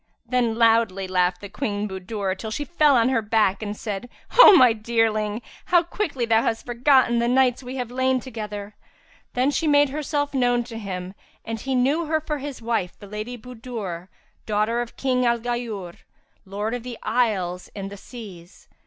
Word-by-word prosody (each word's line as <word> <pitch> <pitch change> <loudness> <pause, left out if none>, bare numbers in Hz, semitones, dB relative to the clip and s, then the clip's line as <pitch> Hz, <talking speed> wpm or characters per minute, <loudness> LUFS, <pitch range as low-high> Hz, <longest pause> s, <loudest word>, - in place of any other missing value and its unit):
Then 240 -2 +1
loudly 225 -4 +3
laughed 180 +1 0
Queen 210 -6 -2
Budur 190 0 -3
till 220 +3 -6
she 290 +7 -3
fell 300 -4 +3
on 235 0 +4
her 245 -4 +2
back,[FN#349] 210 -2 +1
and 205 +1 -5
said, 210 +2 -5 0.3
"O 425 -6 +11
my 250 -5 +7
dearling, 220 -1 0 0.2
how 350 -1 +4
quickly 330 - -2
thou 225 -1 +3
hast 225 -1 -2
forgotten 245 0 +3
the 235 - +1
nights 250 0 +3
we 255 0 -7
have 250 -2 -4
lain 260 +1 +1
together!" 210 -4 -7 0.6
Then 255 +3 +2
she 320 +2 0
made 290 -1 +5
herself 290 0 -2
known 245 -2 +2
to 230 -1 -8
him, 185 -3 -5 0.3
and 225 0 -4
he 265 +3 -2
knew 280 +7 +2
her 315 0 +1
for 300 -1 -4
his 275 -4 -7
wife, 225 -6 -1
the - - -12
Lady 215 +4 -6
Budur, 225 -7 -7 0.4
daughter 215 +3 +1
of 240 - -7
King 255 -2 +1
al 235 -1 +3
Ghayur, 230 -7 -4 0.5
Lord 205 +4 -3
of 245 - -3
the 240 -1 -7
Isles 195 -7 0
and 195 -1 -6
the - - -7
Seas. 195 -6 -12
230 Hz, 180 wpm, -23 LUFS, 210-255 Hz, 0.6 s, O